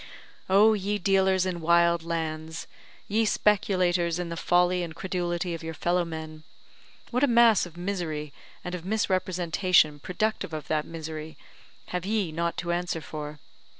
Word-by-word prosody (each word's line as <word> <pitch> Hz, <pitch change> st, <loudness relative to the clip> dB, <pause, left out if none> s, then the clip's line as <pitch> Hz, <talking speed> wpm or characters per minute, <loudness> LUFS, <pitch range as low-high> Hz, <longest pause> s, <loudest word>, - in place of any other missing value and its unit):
Oh, 210 Hz, +3 st, +6 dB
ye 205 Hz, 0 st, -1 dB
dealers 190 Hz, -1 st, +2 dB
in 180 Hz, -2 st, -3 dB
wild 170 Hz, +1 st, +4 dB
lands 160 Hz, -1 st, -4 dB, 0.4 s
ye 220 Hz, +2 st, +2 dB
speculators 185 Hz, -5 st, +2 dB
in 180 Hz, -1 st, -3 dB
the 170 Hz, -, -4 dB
folly 180 Hz, +1 st, +2 dB
and 165 Hz, -2 st, -5 dB
credulity 175 Hz, -1 st, -2 dB
of 165 Hz, -, -5 dB
your 160 Hz, 0 st, -6 dB
fellow 175 Hz, +4 st, +1 dB
men 160 Hz, -2 st, -7 dB, 0.7 s
what 250 Hz, +3 st, +1 dB
a -, -, +6 dB
mass 235 Hz, -5 st, +5 dB
of 170 Hz, -1 st, -16 dB
misery, 170 Hz, -6 st, -3 dB, 0.3 s
and 180 Hz, -, -5 dB
of 180 Hz, -2 st, -5 dB
misrepresentation 185 Hz, -5 st, +2 dB
productive 200 Hz, +1 st, -2 dB
of 155 Hz, -1 st, -5 dB
that 155 Hz, -1 st, 0 dB
misery, 160 Hz, -1 st, -7 dB, 0.5 s
have 180 Hz, -1 st, -3 dB
ye 200 Hz, -4 st, 0 dB
not 170 Hz, +2 st, -2 dB
to 175 Hz, -1 st, -2 dB
answer 175 Hz, -1 st, -1 dB
for! 150 Hz, -1 st, -7 dB
175 Hz, 150 wpm, -27 LUFS, 160-190 Hz, 0.7 s, Oh